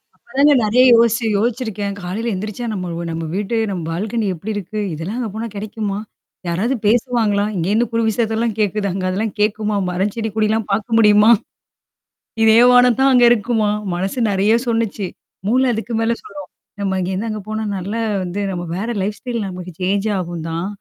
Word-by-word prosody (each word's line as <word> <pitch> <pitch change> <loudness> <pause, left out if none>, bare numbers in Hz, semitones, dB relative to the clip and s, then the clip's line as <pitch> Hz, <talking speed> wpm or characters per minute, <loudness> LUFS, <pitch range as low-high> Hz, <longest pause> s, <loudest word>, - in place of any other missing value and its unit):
அப்ப - - -37 0.2
தாங்க 290 +1 +6
நெறைய 225 +4 +3
யோசிச்சு 230 0 +3
யோசிச்சிருக்கேன். 215 -3 -2
"காலையில 200 +7 -3
எழுந்திரிச்சா 210 +4 -4
நம்ம 175 -3 -4
நம்ம 165 0 -4
வீட்டு 205 +3 -2
நம்ம 185 -3 -3
பால்கனி 215 +6 -2
எப்படி 195 +7 -5
இருக்கு? 205 +1 -4
இதெல்லாம் 165 +9 -5
அங்க 235 -3 -2
போனா 225 +2 -4
கிடைக்குமா? 205 -1 -4 0.5
யாராவது 195 +10 0
பேசுவாங்களா? 220 -2 +2
இங்கேன்னு 200 +7 +1
குறு 230 0 +1
விஷயத்தல்லாம் 225 0 0
கேட்குது. 205 0 0
அங்க 185 0 -3
அதெல்லாம் 200 +2 -2
கேட்குமா? 210 0 0
மரம் 190 +3 -1
செடி, 225 -1 -2
கொடிலாம் 220 0 +1
பார்க்க 220 +3 0
முடியுமா? 210 0 +6 1.1
இதேவானம் 245 +2 +6
தான் 270 0 +5
அங்க 245 -1 +6
இருக்குமா?" 225 -2 +1 0.3
மனசு 190 +6 -3
நெறைய 200 +3 +2
சொல்லுச்சு. 225 -4 -1 0.4
மூளை 255 +4 +3
அதுக்கு 225 +1 -3
மேல 230 +1 +1
சொல்லும். 195 -2 -10 0.3
"நம்ம 190 -1 0
இங்கேருந்து 190 +5 -2
அங்க 215 -1 -4
போனா 215 0 -2
நல்லா 200 +5 -3 0.2
வந்து 180 +3 -4
நம்ம 175 -2 -4
வேற 205 +4 -3
லைஃப் 205 +2 -2
ஸ்டைல் 235 -4 -3
நமக்கு 180 -1 -7
சேஞ்ச் 200 +3 0
ஆகும்தான்? 170 0 -4
210 Hz, 160 wpm, -19 LUFS, 190-230 Hz, 1.1 s, தாங்க